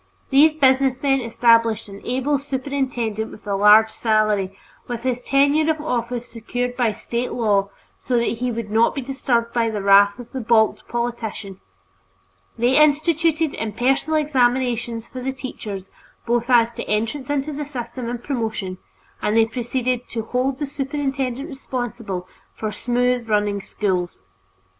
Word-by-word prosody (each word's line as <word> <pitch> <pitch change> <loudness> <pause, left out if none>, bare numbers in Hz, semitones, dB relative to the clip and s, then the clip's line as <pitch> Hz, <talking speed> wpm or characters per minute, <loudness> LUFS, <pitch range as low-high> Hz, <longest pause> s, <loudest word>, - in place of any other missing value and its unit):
These 300 +3 +6
businessmen 270 -1 +3
established 230 -2 +3
an 200 0 -11
able 265 +3 0
superintendent 260 -5 -2
with 215 - -13
a 200 -1 -1
large 210 +2 +6
salary, 215 -4 +1 0.3
with 240 -1 -5
his 250 -1 -1
tenure 285 +4 +3
of 315 -1 +1
office 245 -4 -2
secured 245 +2 -4
by 240 -3 +2
State 235 +3 -4
law 205 -4 +1 0.3
so 250 - 0
that 235 -1 0
he 250 0 -1
would 225 -2 -5
not 225 +2 +3
be 275 - -2
disturbed 245 -3 -1
by 230 -1 +1
the 215 -2 -3
wrath 200 +1 +5
of 245 -2 -11
the 265 - -4
balked 220 -1 +2
politician. 235 -5 -4 1.0
They 245 +3 +3
instituted 315 +1 +3
impersonal 250 +8 0
examinations 245 -5 +1
for 255 - -8
the 265 +1 -2
teachers 210 -7 -7 0.3
both 240 +1 0
as 235 -2 +5
to - - -6
entrance 230 +6 -2
into 290 +1 -1
the 295 +1 -4
system 245 -3 -5
and 240 0 -5
promotion, 220 -8 -3 0.4
and 210 +2 +1
they 225 - +6
proceeded 245 +1 -2
"to 225 -2 -3
hold 255 +3 -1
the 295 - -2
superintendent 275 -1 -3
responsible" 240 - -5 0.3
for 215 -1 -3
smooth 245 +1 0
running 205 -1 +1
schools. 185 -4 -2
240 Hz, 150 wpm, -22 LUFS, 220-265 Hz, 1.0 s, These